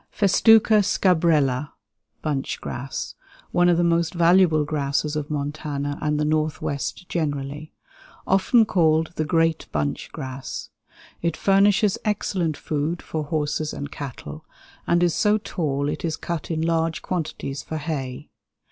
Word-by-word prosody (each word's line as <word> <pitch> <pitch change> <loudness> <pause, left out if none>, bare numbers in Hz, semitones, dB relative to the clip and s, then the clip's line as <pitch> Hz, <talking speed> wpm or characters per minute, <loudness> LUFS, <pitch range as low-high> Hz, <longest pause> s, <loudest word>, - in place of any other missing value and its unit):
Festuca 215 +2 +5
scabrella 160 -8 +2 0.5
(bunch 145 -4 -2
grass). 130 +2 -5 0.4
One 175 0 +4
of 175 - +4
the 175 - +3
most 170 0 +1
valuable 170 -2 +4
grasses 150 0 -1
of 150 -1 -3
Montana 145 -1 -3
and 150 -1 0
the 150 - +1
Northwest 155 0 -2
generally; 145 -2 -3 0.5
often 205 +5 +4
called 160 -4 +2
the 155 - -1
"great 165 0 +1
bunch 75 -1 -2
grass." 130 0 -6 0.5
It 170 -2 -1
furnishes 200 +1 +3
excellent 185 -6 -1
food 155 +3 -2
for 155 -2 -4
horses 150 0 -1
and 145 +1 -6
cattle, 145 +2 -7 0.4
and 175 +1 +3
is 175 -2 +3
so 210 +5 +3
tall 145 -9 -2
it - - -3
is 160 -2 -1
cut 170 -3 -4
in 160 -1 -1
large 165 -1 0
quantities 150 -6 -3
for 160 - -5
hay. 140 -5 -5
155 Hz, 135 wpm, -23 LUFS, 145-175 Hz, 0.5 s, Festuca